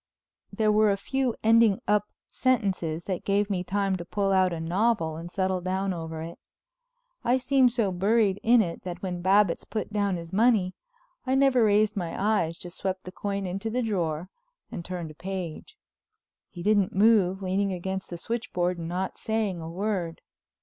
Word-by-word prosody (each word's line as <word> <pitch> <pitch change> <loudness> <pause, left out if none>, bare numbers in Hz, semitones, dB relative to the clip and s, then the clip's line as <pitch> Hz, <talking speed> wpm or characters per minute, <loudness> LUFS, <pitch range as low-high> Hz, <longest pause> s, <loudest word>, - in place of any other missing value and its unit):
There 215 -2 +2
were 215 0 +4
a 200 - +2
few 260 +3 -1
ending 225 -2 +5
up 210 0 +2 0.2
sentences 190 -10 0
that 185 -3 -3
gave 205 +1 +1
me 180 -2 -1
time 195 +1 0
to 175 - -6
pull 195 +3 -1
out 185 -1 +3
a 170 - -3
novel 175 0 0
and 165 +2 -7
settle 185 0 -1
down 190 +1 -1
over 160 -2 -5
it. 170 +1 -9 0.8
I 245 +2 +3
seemed 260 -1 +3
so 225 -5 0
buried 200 +2 +2
in 235 0 +5
it 170 -3 -5
that 180 0 -7
when 180 -2 -3
Babbitts 195 0 +3
put 215 -1 -5
down 200 -2 +1
his 170 0 -8
money 210 -4 +3 0.5
I 260 - +2
never 270 -3 +4
raised 210 0 +3
my 175 -4 -3
eyes, 195 -6 +1
just 175 0 -9
swept 190 -1 -3
the 185 - -8
coin 200 0 -3
into 195 +4 -3
the 250 +3 -1
drawer 175 -5 -2 0.4
and 170 - -5
turned 175 -3 -5
a - - -12
page. 185 - -6 0.7
He 175 -2 -9
didn't 205 -2 +2
move, 195 -2 +4
leaning 195 +2 0
against 190 +1 -4
the 175 - -6
switchboard 180 -5 -2
and 165 - -5
not 185 +2 -3
saying 215 -6 -1
a 160 - -6
word. 180 -2 -3
195 Hz, 180 wpm, -27 LUFS, 175-215 Hz, 0.8 s, ending